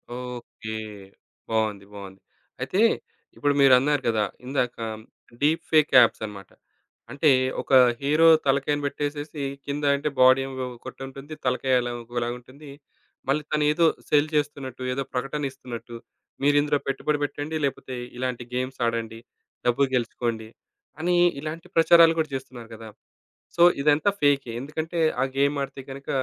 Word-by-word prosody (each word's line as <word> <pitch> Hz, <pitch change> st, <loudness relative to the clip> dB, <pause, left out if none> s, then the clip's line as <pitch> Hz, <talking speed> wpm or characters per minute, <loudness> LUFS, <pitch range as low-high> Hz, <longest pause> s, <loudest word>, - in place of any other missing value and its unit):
Okay. 125 Hz, -3 st, -7 dB, 0.7 s
బావుంది. 110 Hz, -3 st, -1 dB
బావుంది. 95 Hz, -1 st, -10 dB, 0.4 s
అయితే 195 Hz, -, 0 dB, 0.6 s
ఇప్పుడు 145 Hz, 0 st, +1 dB
మీరన్నారు 135 Hz, +2 st, +5 dB
గదా! 110 Hz, -2 st, +2 dB, 0.2 s
ఇందాక 125 Hz, -2 st, -1 dB, 0.7 s
డీప్ 155 Hz, +3 st, +2 dB
ఫేక్ 155 Hz, -2 st, +4 dB
ఆప్సన్నమాట. 105 Hz, -3 st, -3 dB, 0.6 s
అంటే 140 Hz, +4 st, +2 dB, 0.3 s
ఒక -, -, -4 dB, 0.3 s
హీరో 150 Hz, +4 st, +4 dB, 0.2 s
తలకాయని 140 Hz, +2 st, +1 dB
బెట్టేసేసి 145 Hz, +1 st, -4 dB, 0.2 s
కింద 145 Hz, +1 st, -4 dB
అంటే 145 Hz, +2 st, -2 dB
బాడీ 130 Hz, +1 st, +7 dB
ఏమో 130 Hz, -1 st, -4 dB
ఒకటుంటుంది. 135 Hz, +4 st, -9 dB
తలకాయలాగా 125 Hz, -1 st, 0 dB
ఇంకోలాగుంటుంది. 120 Hz, +4 st, -6 dB, 0.6 s
మళ్ళీ 150 Hz, +2 st, +1 dB
తనేదో 150 Hz, +2 st, +3 dB, 0.2 s
సెల్ 150 Hz, +1 st, +3 dB
చేస్తున్నట్టు, 140 Hz, -4 st, -2 dB
ఏదో 135 Hz, +1 st, -2 dB
ప్రకటన 135 Hz, +3 st, -2 dB
ఇస్తున్నట్టు, 120 Hz, -3 st, -9 dB, 0.5 s
"మీరు 145 Hz, +1 st, +4 dB
ఇందులో 145 Hz, 0 st, +1 dB
పెట్టుబడి 145 Hz, +2 st, 0 dB
బెట్టండి. 145 Hz, +2 st, -4 dB
లేకపోతే 130 Hz, -1 st, -4 dB, 0.2 s
ఇలాంటి 125 Hz, -1 st, -3 dB
గేమ్స్ 130 Hz, +1 st, -3 dB
ఆడండి. 115 Hz, -1 st, -2 dB, 0.5 s
డబ్బులు 135 Hz, +3 st, +3 dB
గెలుచుకోండి" 115 Hz, -2 st, -2 dB, 0.5 s
అని 175 Hz, +2 st, +1 dB, 0.2 s
ఇలాంటి 155 Hz, +3 st, -6 dB
ప్రచారాలు 165 Hz, 0 st, +7 dB
గూడా 155 Hz, -1 st, 0 dB
చేస్తున్నారు 125 Hz, -3 st, -8 dB
గదా! 110 Hz, 0 st, -10 dB, 0.7 s
సో, 170 Hz, -, +4 dB, 0.2 s
ఇదంతా 150 Hz, +6 st, +3 dB
ఫేకే. 140 Hz, -4 st, +2 dB
ఎందుకంటే 155 Hz, +5 st, -4 dB, 0.2 s
ఆ -, -, +4 dB
గేమ్ 140 Hz, +1 st, +2 dB
ఆడితే 135 Hz, 0 st, -7 dB
గనక 140 Hz, +1 st, -9 dB
135 Hz, 125 wpm, -25 LUFS, 125-150 Hz, 0.7 s, బాడీ